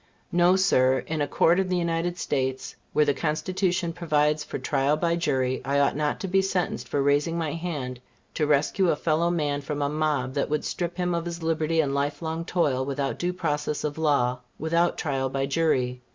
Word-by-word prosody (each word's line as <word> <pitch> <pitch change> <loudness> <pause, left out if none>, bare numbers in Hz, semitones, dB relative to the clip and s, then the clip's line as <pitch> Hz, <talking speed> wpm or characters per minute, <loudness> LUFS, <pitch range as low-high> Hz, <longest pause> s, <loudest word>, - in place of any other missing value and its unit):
No 175 +1 +4
sir; 130 -9 +3
in 155 -1 -2
a 145 - +1
Court 170 +5 +3
of 190 -1 0
the 180 - +1
United 170 0 -1
States, 130 -5 -2 0.2
where 150 - +3
the 145 - +2
Constitution 175 +3 -1
provides 150 -3 +1
for - - -5
trial 140 +1 +1
by 170 +1 +1
jury, 130 -6 0
I 140 +1 +1
ought 140 - +2
not 150 0 -1
to 195 - -2
be 195 +1 +3
sentenced 190 -2 -2
for 140 - 0
raising 145 +4 +2
my 160 -3 -2
hand 145 -7 -4 0.3
to 150 - 0
rescue 150 +6 +2
a - - +3
fellow 160 +2 +1
man 145 -4 -1
from 145 0 -3
a 140 - 0
mob 150 -4 -1
that 140 - -1
would 150 0 -1
strip 175 0 -3
him 180 -1 0
of 170 0 -2
his 170 -1 -5
liberty 160 0 +1
and 140 -3 -1
life 145 +3 -1
long 160 +1 -3
toil 145 -8 +1
without 140 0 -2
due 175 +1 0
process 150 -4 -2
of 150 0 -3
law, 130 -5 +2 0.2
without 170 +3 +1
trial 135 -4 -1
by 135 +1 -1
jury. 135 -4 0
150 Hz, 205 wpm, -26 LUFS, 140-170 Hz, 0.3 s, No